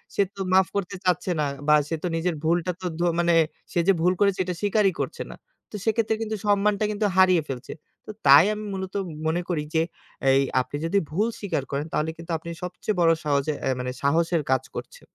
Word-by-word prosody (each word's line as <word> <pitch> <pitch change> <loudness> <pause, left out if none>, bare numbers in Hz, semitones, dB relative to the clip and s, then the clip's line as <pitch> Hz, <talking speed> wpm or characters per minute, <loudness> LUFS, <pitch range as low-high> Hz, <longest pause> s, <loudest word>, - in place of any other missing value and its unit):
সে - - +3
তো 195 - -6
মাফ 190 -1 +5
করতে 200 -2 -2
চাচ্ছে 180 0 +1
না, 150 - +2 0.2
বা 150 - +7
সে 165 - -2
তো 180 - 0
নিজের 165 +1 -1
ভুলটা 170 +2 +1
তো - - -6
ধ - - -1 0.2
মানে 170 0 +3 0.4
সে - - 0
যে 195 - +6
ভুল 180 +2 +3
করেছে 200 -2 +3
এটা 180 -1 -4
স্বীকারই 205 -2 +2
করছে - - -4
না। - - -9 0.4
তো - - -7
সেক্ষেত্রে 220 0 +1
কিন্তু 220 -1 -2
সম্মানটা 205 +1 +2
কিন্তু 210 0 -1
হারিয়ে 185 -3 +5
ফেলছে। 125 -2 -6 0.3
তো - - -6 0.2
তাই 140 +5 +9
আমি 215 0 -6
মূলত 190 -1 -5 0.3
মনে 165 +2 +1
করি 160 -4 -1
যে 160 - +4 0.5
এই 135 +1 +5 0.2
আপনি 130 +3 -7
যদি 200 +5 +2
ভুল 205 +8 +1
স্বীকার 195 -9 -2
করেন, 140 +1 -2
তাহলে 155 +1 0
কিন্তু 165 +1 -8
আপনি 165 +2 -9
সবচেয়ে 180 +3 -3
বড় 165 -1 +5
সহজে 145 +1 +1
এ - - +2
মানে 125 0 -3
সাহসের 165 +4 +2
কাজ 130 - +2
করছে - - -7
180 Hz, 210 wpm, -25 LUFS, 160-200 Hz, 0.5 s, তাই